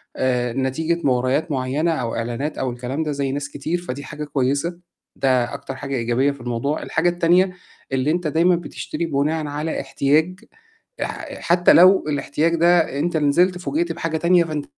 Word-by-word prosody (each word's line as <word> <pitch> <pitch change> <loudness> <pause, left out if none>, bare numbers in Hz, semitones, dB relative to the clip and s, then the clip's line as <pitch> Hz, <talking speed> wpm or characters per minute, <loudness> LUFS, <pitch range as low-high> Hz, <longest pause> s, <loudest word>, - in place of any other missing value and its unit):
آآ 125 -2 0
نتيجة 155 +6 -1
مُغريات 130 +4 +1
معيّنة 140 +5 0
أو 125 -8 -2
إعلانات 120 +6 -3
أو 130 -2 -1
الكلام 125 +6 -3
ده 150 - -2
زي 140 -2 -2
ناس 140 +1 -4
كتير 160 +6 -3
فدي 140 -3 -6
حاجة 150 +2 -7
كويسة، 145 +4 -1 0.4
ده 130 -3 +1
أكتر 135 - -6
حاجة 140 0 -4
إيجابية 120 +4 +1
في 140 - -11
الموضوع. 120 +5 -2
الحاجة 170 +2 +1
التانية 175 +2 +3 0.4
اللي 135 +3 +1
أنت 175 -1 -1
دايمًا 170 +4 +3
بتشتري 170 0 -5
بناءً 155 +1 -1
على 150 +2 -3
احتياج 150 +7 +1 0.6
آآ - - -5
حتّى 175 +1 +4
لو 185 +3 +6
الاحتياج 150 +3 0
ده 170 -4 +3
أنت 165 +1 0
نزلت 175 +5 +3
فوجئت 315 - -2
بحاجة 160 -1 -2
تانية 175 +2 +4
فأنت 155 -3 -4
150 Hz, 165 wpm, -21 LUFS, 135-170 Hz, 0.6 s, لو